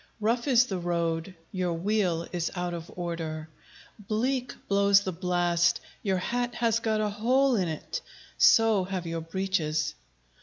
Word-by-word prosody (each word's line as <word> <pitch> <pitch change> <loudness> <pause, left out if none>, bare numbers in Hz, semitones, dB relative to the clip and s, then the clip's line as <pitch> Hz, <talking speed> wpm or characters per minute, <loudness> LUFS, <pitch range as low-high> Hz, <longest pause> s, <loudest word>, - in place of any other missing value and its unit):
Rough 230 +5 0
is 250 -2 +5
the 190 -7 -3
road; 170 0 -1 0.2
your 180 -2 -1
wheel 175 -2 0
is 175 -2 -1
out 180 -1 -2
of 170 -1 -6
order 165 -3 -4 0.5
Bleak 245 +5 -1
blows 200 0 +5
the 190 - -3
blast; 175 -1 +1 0.2
your 190 -2 0
hat 245 +6 -2
has 230 -1 +2
got 220 -2 0
a 210 - +1
hole 250 +6 +2
in't, 170 -7 -2 0.3
So 225 -4 +5
have 185 -2 -4
your 165 0 -3
breeches! 160 -3 -1
185 Hz, 145 wpm, -28 LUFS, 170-220 Hz, 0.5 s, is